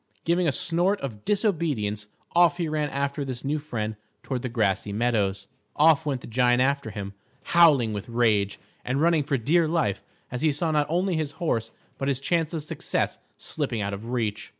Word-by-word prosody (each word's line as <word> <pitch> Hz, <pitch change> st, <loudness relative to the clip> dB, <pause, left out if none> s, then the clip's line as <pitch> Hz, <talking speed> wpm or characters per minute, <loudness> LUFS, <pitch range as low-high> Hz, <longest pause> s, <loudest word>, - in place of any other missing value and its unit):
Giving 170 Hz, +1 st, +2 dB
a -, -, +3 dB
snort 175 Hz, +7 st, +2 dB
of 110 Hz, -7 st, -6 dB
disobedience, 155 Hz, -, 0 dB, 0.3 s
off 175 Hz, 0 st, +5 dB
he 170 Hz, -3 st, -1 dB
ran 150 Hz, -1 st, -1 dB
after 140 Hz, +1 st, -2 dB
this 130 Hz, -1 st, -5 dB
new 150 Hz, +2 st, 0 dB
friend 110 Hz, -8 st, -4 dB, 0.3 s
toward 130 Hz, -3 st, -3 dB
the 125 Hz, -, -3 dB
grassy 105 Hz, -3 st, 0 dB
meadows. 100 Hz, -3 st, 0 dB, 0.3 s
Off 155 Hz, 0 st, +4 dB
went 135 Hz, -4 st, -1 dB
the -, -, -10 dB
giant 120 Hz, +1 st, +2 dB
after 140 Hz, -2 st, +1 dB
him, 100 Hz, -1 st, -6 dB, 0.3 s
howling 150 Hz, -10 st, +5 dB
with 105 Hz, +2 st, -5 dB
rage, 110 Hz, -4 st, +2 dB, 0.3 s
and 130 Hz, +2 st, -1 dB
running 165 Hz, 0 st, +3 dB
for 140 Hz, -1 st, 0 dB
dear 160 Hz, +8 st, +2 dB
life, 155 Hz, -, 0 dB, 0.3 s
as 125 Hz, -, -4 dB
he 155 Hz, -1 st, +3 dB
saw 160 Hz, +3 st, -1 dB
not 150 Hz, -1 st, +2 dB
only 180 Hz, +1 st, +1 dB
his 150 Hz, -2 st, -2 dB
horse 115 Hz, -9 st, -1 dB, 0.3 s
but 135 Hz, -, -2 dB
his 135 Hz, -2 st, 0 dB
chance 160 Hz, +2 st, 0 dB
of 160 Hz, -3 st, -4 dB
success 150 Hz, -, -2 dB, 0.2 s
slipping 115 Hz, -3 st, -3 dB
out 100 Hz, 0 st, -2 dB
of 105 Hz, +4 st, -6 dB
reach. 110 Hz, -4 st, -2 dB
140 Hz, 190 wpm, -26 LUFS, 115-160 Hz, 0.3 s, off